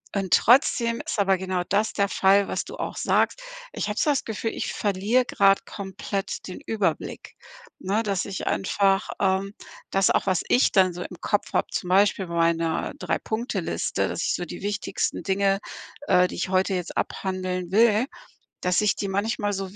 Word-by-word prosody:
und 190 -4 0
trotzdem 235 - +4
ist 315 - -3
aber 195 -1 +3
genau 185 -1 -2
das 210 +3 +1
der 200 -1 +1
Fall, 195 +1 +3
was - - -2
du - - -8
auch - - -4
sagst. - - +1 0.3
Ich - - -3
habe 210 - -3
so 300 - +2
das 280 - +1
Gefühl, 225 +1 -3
ich - - -3
verliere 210 +5 +1
grad 195 -4 +3
komplett 195 0 -5
den 185 - -7
Überblick, 200 -7 -2 0.4
ne, 200 +4 0
dass 200 -3 -1
ich 195 -1 -5
einfach 195 +1 +1
ähm, 195 +1 +1 0.4
dass 195 -1 +3
auch - - +2
was 185 -2 +2
ich 250 - +4
dann 185 -2 +4
so 175 - -7
im 180 - -10
Kopf 205 - -1
habe, - - +1
zum 180 - -3
Beispiel 195 0 +3
bei 170 - -5
meiner 165 -1 +1
3- - - -2
Punkte-Liste, 230 +3 -2
dass - - -3
ich - - +1
so 180 - -3
die 175 - -8
wichtigsten 205 0 -2
Dinge, 195 0 +1 0.5
äh, 180 -1 +5
die - - -8
ich - - -3
heute 190 +1 +2
jetzt 180 -1 -4
abhandeln 185 -2 -3
will, 220 +2 +4 0.6
dass 180 +2 +2
ich 210 -2 +2
die 200 - -3
manchmal 205 +1 -1
so 195 0 -5
195 Hz, 185 wpm, -25 LUFS, 185-210 Hz, 0.6 s, äh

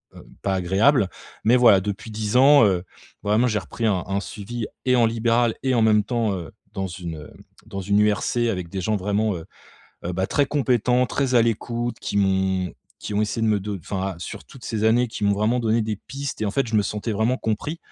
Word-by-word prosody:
heu, - - -13 0.2
pas 95 -1 0
agréables. 95 +5 +3 0.3
Mais 120 +3 +5
voilà, 110 -6 +6
depuis 105 +2 -5
10 110 +2 -1
ans, 140 -2 +7
heu, 90 -3 +1 0.4
vraiment 105 +4 +2
j'ai 105 -3 0
repris 115 +4 -5
un 95 -4 +1
un 100 0 0
suivi, 110 +3 -6 0.2
et 125 0 +4
en 120 - +4
libéral, 115 +1 +2
et 130 -1 +2
en 115 - +3
même 105 -1 +4
temps, 115 -2 0
heu, 85 -1 -7 0.2
dans 95 -2 -2
une, 85 -2 -6
heu, 75 - -11 0.4
dans 100 0 -5
une 100 +2 +2
URC, 105 +3 +1
avec 90 -5 -3
des 95 +1 -4
gens 105 +4 0
vraiment, 105 +1 0
heu 80 - -7 0.6
heu, 90 - -2
bah, 95 +2 -1
très 145 -2 +1
compétents, 125 -3 +2
très 135 -3 -1
à 115 - +6
l'écoute, 120 +1 -2
qui - - -3
m'ont 95 -2 +1 0.3
qui 105 - -5
ont 105 - +2
essayé 115 +2 -2
de - - +2
me 105 -2 +2
do 105 0 -4
enfin, 95 +1 -4
sur 85 - -7
toutes 130 - -14
ces 110 -2 -3
années, 120 +3 +4
qui 110 - -7
m'ont 100 - +4
vraiment 110 +5 +1
donné 115 0 +1
des 110 0 -2
pistes 140 +3 -6
et, - - +1
en - - 0
fait, 135 +6 0
je 110 - -5
me 105 - +4
sentais 105 +2 -3
vraiment 110 +5 +1
compris. 130 +9 -3
110 Hz, 230 wpm, -23 LUFS, 100-120 Hz, 0.6 s, ans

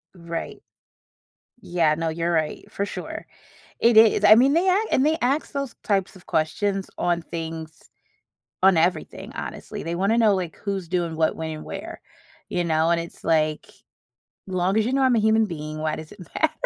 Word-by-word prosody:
Right. 170 -1 -6 1.0
Yeah, 165 -5 +1
no, 165 0 -2
you're 165 +2 -1
right, 155 -2 -1
for 200 - -2
sure. - - -7 0.5
It 230 -1 +4
is, 220 -1 +6
I 210 +1 +10
mean, 265 +5 +4
they 360 +3 +3
act 415 +4 +2
and 265 - +3
they 315 +1 +2
ask 275 +5 0
those 275 -3 -3
types 195 -2 0
of 180 - -16
questions 195 +5 -1
on 175 -1 0
things 160 -1 -7 0.7
on 190 -2 +6
everything, 165 0 -1
honestly, - - -6
they 165 +1 -3
wanna 200 +6 +1
know, 215 -3 +5
like, 180 -4 -3
who's 195 -4 -4
doing 170 -3 -1
what, 160 -1 +1
when 160 0 -4
and 155 -1 -7
where, - - -7 0.5
you 175 - -1
know? 160 0 +2
And 170 - +3
it's, 170 - -9
like, 155 -2 +1 0.8
"Long 185 +2 0
as 220 - +3
you 250 - -1
know 270 0 +2
I'm 260 -2 +4
a - - +4
human 220 0 +3
being, 155 -3 -6
why 155 0 -1
does 155 0 -9
it 200 - -15
matter? - - +2
175 Hz, 185 wpm, -24 LUFS, 160-220 Hz, 1.0 s, I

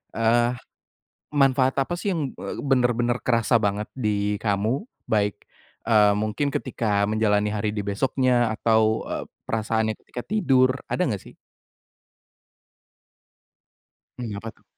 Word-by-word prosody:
eee, 120 +1 +3 0.8
manfaat 135 -2 +3
apa 135 - -2
sih 195 +2 -1
yang 155 -6 -2
e - - -5
bener-bener 125 -3 +2
kerasa 115 0 +3
banget 105 0 -1
di 105 -3 0
kamu? 110 - 0 0.2
Baik, 105 -2 +1 0.5
eee, 105 -2 +5
mungkin 110 +7 -1
ketika 105 -5 0
menjalani 105 -1 +2
hari 105 0 -1
di 105 - -2
besoknya? 120 +2 +1
Atau 110 0 +2
e - - -3 0.4
perasaannya 110 0 0
ketika 125 - -7
tidur? 135 -11 +3
Ada - - -1
nggak 100 -5 -3
sih? - - -14 2.8
Mmm, 120 -4 -4
apa 115 - -6
tuh? - - -31
115 Hz, 120 wpm, -24 LUFS, 105-130 Hz, 2.8 s, eee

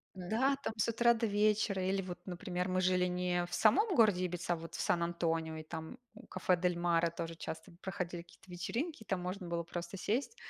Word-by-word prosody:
Да, 225 +10 +1
там 220 - -2
с 215 - +1
утра 235 +1 +4
до 230 0 0
вечера. 205 -2 +2
Или 195 0 +1
вот, 180 -2 -6
например, 180 0 -3
мы 185 0 +1
жили 180 0 +3
не 180 -1 0
в 175 - -6
самом 380 - +4
городе 210 -6 +5
Ибица, 175 0 -1
а - - -3
вот 165 0 -9
в - - -4
Сан-Антонио, 165 -2 0
и 155 - -5
там 160 0 -7 0.2
у 240 +3 -13
кафе 180 - +1
"Дель 180 0 +1
Мара" 170 -1 +2
тоже 165 0 -5
часто 170 +3 -6
проходили 180 -3 -4
какие-то 175 +2 -19
вечеринки. 230 - -3
Там 190 -3 -1
можно 180 +1 -4
было 170 0 -1
просто 175 +3 -6
сесть, 255 - -1
180 Hz, 205 wpm, -34 LUFS, 170-210 Hz, 0.2 s, городе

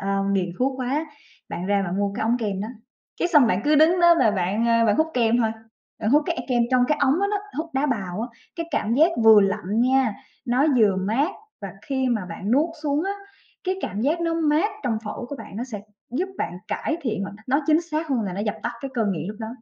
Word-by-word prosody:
ơ, 195 0 -1
nghiện 185 -2 +1
thuốc 265 +1 0
quá, 280 +6 -1 0.4
bạn 180 - -5
ra 200 0 +2
bạn 190 +1 -3
mua 200 -1 0
cái - - -3
ống 230 +2 +2
kem 205 -4 -2
đó. 210 - -4 0.5
Cái 350 - +2
xong 295 -7 +6
bạn 200 -4 +1
cứ 300 - +4
đứng 320 +4 +5
đó 345 0 +7
và 230 -4 +4
bạn, 200 +3 0
ơ, 230 0 +4
bạn 210 - +3
hút 315 - +3
kem 235 -1 +3
thôi, 225 -2 +2 0.5
bạn 215 - 0
hút 295 +3 +5
cái 340 - -1
e - - -2
cái - - -10
kem 240 -2 +2
trong 250 -1 +4
cái 300 0 +1
ống 280 +6 +3
đó 400 - +2
đó, 415 - 0 0.2
hút 330 +1 -3
đá 270 +2 +1
bào 200 -7 -2
á. 240 - -3 0.3
Cái 335 - -3
cảm 230 -6 0
giác 315 +6 +5
vừa 220 -2 +9
lạnh 200 +2 0
nha, 255 -3 +3 0.3
nó 250 +4 +2
vừa 210 -4 +4
mát 220 +10 0 0.3
và 200 - -5
khi 265 -2 -1
mà 225 -6 0
bạn 190 +4 -5
nuốt 290 +7 +3
xuống 295 +2 0
á, 390 - -1 0.5
cái 375 0 0
cảm 200 - -3
giác 305 +8 +1
nó 330 -1 0
mát 320 +5 +2
trong 225 -3 0
phổi 215 +3 -5
của 285 - -6
bạn, 210 -4 -10
nó 240 - -3
sẽ 225 -6 -7 0.3
giúp 335 +11 -1
bạn 175 - -3
cải 320 - -2
thiện 220 -6 -2
hoặc 195 - -5
nói 275 +3 +2
chính 315 0 +4
xác 320 -1 -3
hơn 260 -5 +1
là 195 -3 -3
nó 195 - -4
dập 210 0 -1
tắt - - -2
cái 270 +1 -5
cơn 225 -4 +1
nghiện 165 +1 -4
lúc 210 - -6
đó. 220 - -4
240 Hz, 260 wpm, -23 LUFS, 205-295 Hz, 0.5 s, vừa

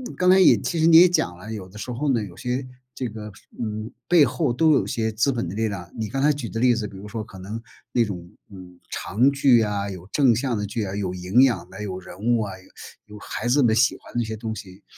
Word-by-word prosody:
刚 180 0 +2
才 190 +1 +7
也 185 - +7
其 170 - -3
实 160 - +3
你 165 - +6
也 180 +1 +8
讲 90 - 0
了， 105 +5 -9
有 95 -4 -7
的 100 +3 -14
时 125 +4 -6
候 140 +4 -1
呢， 115 - +1
有 90 -3 -9
些， 125 +1 -3 0.3
这 130 - -3
个， 105 -1 -8 0.3
嗯， 110 -1 -4 0.2
背 170 -5 +6
后 125 -1 -1
都 155 +5 +3
有 135 - +2
一 - - -7
些 110 -1 -1
资 115 +6 +1
本 115 -9 -2
的 95 - -6
力 110 0 0
量。 90 -4 -7
你 110 -2 -3
刚 135 0 -2
才 150 +1 +4
举 135 -5 -6
的 115 - -4
例 125 -1 +4
子 110 -2 -3
比 95 - -12
如 100 +2 -9
说 110 +1 -5
可 95 -3 -13
能， 105 +5 -6 0.3
那 120 - +4
种， 90 -4 -7 0.2
嗯， 90 -2 -12
长 120 +9 +1
剧 135 -4 +4
啊， 100 -1 -1
有 90 -2 -8
正 130 -6 +4
向 125 -3 -1
的 105 - -2
剧 105 +2 -3
啊， 95 -1 -4
有 95 -3 -2
营 90 +7 +2
养 125 -4 +1
的， 105 - -9
有 95 -3 -4
人 90 -1 -12
物 115 +1 +1
啊， 100 - -3
有 105 +2 -14
有 - - -9
孩 115 - -5
子 135 +2 +3
们 110 -2 +4
喜 125 +2 +3
欢 - - -16
的 120 - -1
一 - - 0
些 110 0 -4
东 110 0 -4
西。 95 -1 -11
110 Hz, 295 characters per minute, -23 LUFS, 100-125 Hz, 0.3 s, 也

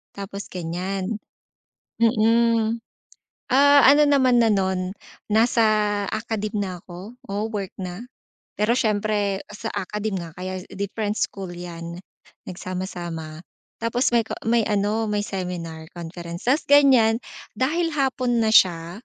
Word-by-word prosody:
tapos 200 0 -6
ganiyan. 185 +4 -3 0.8
Mm, 230 0 +3 0.7
ah, 285 +1 +7
ano 290 +2 +7
naman 260 -4 +4
na 225 - +4
no'n, 190 -2 0 0.4
nasa 230 +2 +4 0.5
academe 215 -1 -3
na 195 -2 -2
ako, 185 +6 -10 0.2
oo 205 +1 -1
work 200 -3 -4
na, 185 +4 -5 0.5
pero 210 +3 +1
siyempre 205 -2 0
sa 220 +2 -6
academe 210 +1 -3
nga 165 - -8
kaya 185 0 -5 0.2
different 205 +1 -2
school 195 -2 -3
'yan, 170 -1 -7 0.5
nagsama-sama 175 -3 -6 0.3
tapos 230 +3 0
may 235 -1 +2
ko - - -6 0.2
may 230 -1 +3
ano, 210 +2 0
may 210 -1 -1
seminar 180 -5 -5
conference 170 +3 -7
ta's 280 +5 +3
ganiyan 260 -6 +5 0.3
dahil 330 +6 0
hapon 255 -4 +1
na 220 - +2
siya, 180 0 +3
205 Hz, 125 wpm, -23 LUFS, 185-230 Hz, 0.8 s, ah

